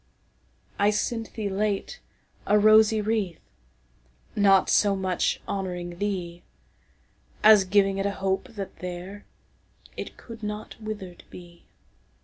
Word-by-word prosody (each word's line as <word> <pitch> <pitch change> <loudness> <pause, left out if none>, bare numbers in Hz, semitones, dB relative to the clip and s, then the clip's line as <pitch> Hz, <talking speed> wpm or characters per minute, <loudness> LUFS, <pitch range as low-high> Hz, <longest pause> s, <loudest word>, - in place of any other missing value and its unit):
I 205 +1 +4
sent 225 +2 -2
thee 215 -2 -2
late 205 - -2 0.5
a 210 - +5
rosy 215 +1 +5
wreath, 210 -5 -1 1.0
Not 195 -2 +5
so 205 -1 +3
much 185 -2 0
honouring 180 -3 -4 1.5
theeAs 210 -3 +7
giving 195 0 +3
it 195 - 0
a 200 - -4
hope 190 0 -1
that 195 -2 -6
thereIt 180 +3 -10
could 230 -1 -11
not 210 0 -5
wither'd 205 -5 -7
be. 175 -1 -14
200 Hz, 110 wpm, -26 LUFS, 190-215 Hz, 1.5 s, theeAs